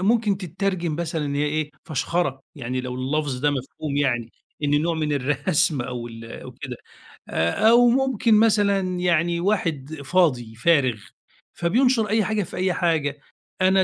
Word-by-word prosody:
ممكن 210 0 +2
تتّرجم 180 -2 -2
مثلًا 160 -2 -2
إن 140 - -3
هي 145 +1 +1
إيه 150 0 -1
فشخرة، 140 -1 -1
يعني 130 -3 -3
لو 125 0 -5
اللفظ 135 +1 -2
ده 145 +2 +3
مفهوم 140 +2 -4
يعني، 120 -5 0 0.3
إنّه 145 0 +2
نوع 165 +2 0
من 155 -2 -1
الرسم 150 +2 +1
أو 120 -1 -5
ال 115 0 -10 0.2
أو 125 - -9
كده، 125 0 -7 0.5
آآ 85 - +2
أو 240 +1 +6
ممكن 255 -2 +2
مثلًا 200 -4 +2
يعني 170 -1 +1
واحد 165 -7 -1
فاضي 130 -11 +1
فارغ، 130 -5 +2 0.5
فبينشر 225 +5 +2
أي 220 +1 +2
حاجة 210 +1 0
في - - -9
أي 185 0 +1
حاجة. 155 -5 0 0.4
"أنا 190 0 +4
160 Hz, 155 wpm, -23 LUFS, 135-190 Hz, 0.5 s, أو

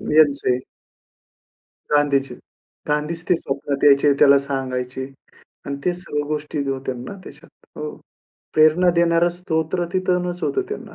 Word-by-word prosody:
यांचे. 140 -5 +4 1.3
गांधीजी. 140 -2 +2 0.5
गांधीच 150 +3 -1
ते 180 - +5
स्वप्नात 140 -1 -3
यायचे, 145 0 +6
त्याला 140 -1 +7
सांगायचे. 130 -2 -3 0.6
आणि 140 0 -3
ते 180 - +2
सर्व 160 -5 -3
गोष्टी 150 -1 -3
होत्या 130 -1 -3
ना 125 +11 -7
त्याच्यात. - - -13 0.3
हो, 450 - -4 0.6
प्रेरणा 155 +3 +5
देणारं 170 0 +3
स्तोत्र 175 -1 -1
तिथूनच 180 -1 -1
होतं 395 - 0
त्यांना, 425 - -7
150 Hz, 120 wpm, -21 LUFS, 140-175 Hz, 1.3 s, त्याला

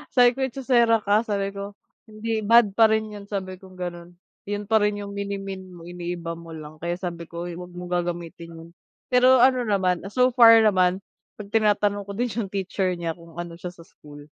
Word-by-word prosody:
Sabi 245 -1 +6
ko, - - -9
"Echosera 235 -4 +2
ka." 205 +1 +3
Sabi 200 -1 -1
ko 200 0 -7 0.3
hindi 220 +1 -3
bad 220 -1 +5
pa 225 +3 +5
rin 220 0 0
'yon 205 -1 -10
sabi 185 -2 -5
kong 190 -1 -15
gano'n. 175 -1 -7 0.3
'Yun 205 0 -3
pa 220 +2 +2
rin 210 0 +1
yung 200 - -7
minimean 195 -1 -5
mo 170 - -12
iniiba 175 -1 -5
mo 165 -1 -10
lang, 155 0 -10
kaya 170 +2 -2
sabi 170 -2 -6
ko, 170 0 -7
"Oy, 175 0 -6
'wag 180 0 -10
mong 180 0 -8
gagamitin 170 -1 -6
'yun." 165 +1 -12 0.4
Pero 250 0 +6
ano 255 -2 +3
naman 185 -3 +1
so 250 +5 +2
far 230 -2 +7
naman 185 -2 +2 0.3
'pag 205 -1 -10
tinatanong 205 -2 +1
ko 200 - -6
din 240 +1 -1
yung 220 -1 -3
teacher 190 -1 -2
niya 170 -1 -3
kung 165 0 -14
ano 170 0 -7
siya 180 0 -7
sa 165 - -14
school, 145 -3 -15
195 Hz, 205 wpm, -24 LUFS, 175-215 Hz, 0.4 s, far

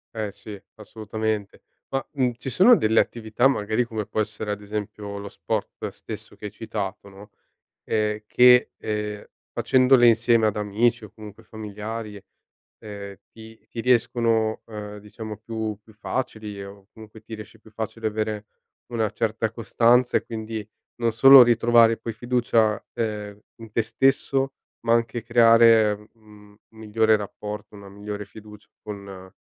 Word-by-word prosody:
Eh, 110 -2 -3
sì, 105 0 -10 0.2
assolutamente 110 -1 -4 0.3
ma, 135 -1 -2
mhmm, 130 -4 +1
ci 130 - -6
sono 215 - +6
delle 110 - +2
attività, 115 +2 +1
magari, 110 -2 0
come 110 -3 -5
può - - -3
essere, 105 0 -3
ad 105 0 -4
esempio, 105 0 -6
lo 100 - -7
sport - - -4
stesso, - - -10
che - - -11
hai 105 - -5
citato, 100 -3 -6
no, 100 +2 -14 0.6
e 105 0 -1
che, 125 +2 +5
ehm, 105 -1 -4 0.3
facendole 130 -1 +4
insieme 115 0 +4
ad 105 -1 0
amici 110 +3 0
o - - -12
comunque 105 -2 -12
familiari, 105 -1 -7 0.6
ehm, 100 -2 -9
ti 110 0 -14
ti 115 - -6
riescono, 115 -2 +1
ehm, 105 -1 -8
diciamo, 105 +1 -9
più 110 -1 -4
più 110 - -19
facili 105 -3 -5
o 100 0 -13
comunque 110 0 -13
ti 110 - -11
riesce 110 +1 -12
più 110 - -19
facile 110 +1 -4
avere 110 -1 -3 0.5
una 110 -3 0
certa 110 -1 -1
costanza 120 +2 +3
e, - - -4
quindi, 110 -2 -6 0.3
non 115 -1 0
solo 135 +4 +9
ritrovare 115 -1 +4
poi 115 - -6
fiducia, 115 -2 +1
ehm, 105 -3 -4 0.2
in 115 -1 -13
te 115 - +1
stesso, 135 +3 +1 0.3
ma 115 0 +2
anche 115 0 0
creare, 115 -2 +5 0.2
mhmm, 105 -2 -19 0.2
un - - -18
migliore 110 0 +2
rapporto, 105 0 -7
una 100 -1 -12
migliore 105 +1 -7
fiducia 105 0 -14 0.2
con 100 -2 -9
110 Hz, 150 wpm, -24 LUFS, 105-115 Hz, 0.6 s, solo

